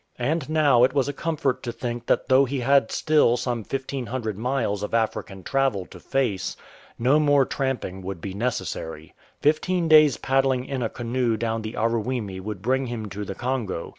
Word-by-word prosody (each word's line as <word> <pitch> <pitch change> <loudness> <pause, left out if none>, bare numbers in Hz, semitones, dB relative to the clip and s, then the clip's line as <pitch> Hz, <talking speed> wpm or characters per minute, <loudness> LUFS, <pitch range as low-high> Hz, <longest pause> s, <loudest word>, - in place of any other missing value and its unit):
And 145 +4 -1
now 145 -6 +4
it 130 +1 +4
was 140 -2 +2
a 145 - -2
comfort 145 -3 -1
to 120 - -4
think 120 0 -5
that - - +1
though 130 +1 +5
he 135 0 -3
had 135 -2 +3
still 150 -6 +3
some 120 -2 -2
1500 125 -2 -4
miles 115 -3 -1
of 105 +2 -2
African 110 -4 -2
travel 135 -8 0
to - - -13
face, 120 -9 -1 0.4
no 130 +6 +3
more 145 -2 +4
tramping 130 -10 -3
would 95 -1 -5
be 95 +3 -6
necessary. 90 -8 -4 0.3
Fifteen 165 +4 +2
days' 155 -3 +6
paddling 135 -1 +1
in 135 -2 -3
a 115 - 0
canoe 120 -1 -1
down 115 0 -1
the 110 +1 -6
Aruwimi 115 -3 -1
would 100 0 -6
bring 130 +2 +1
him 110 -3 -5
to 105 +2 -5
the 95 -1 -6
Congo. 120 -8 -3
125 Hz, 180 wpm, -24 LUFS, 110-135 Hz, 0.4 s, days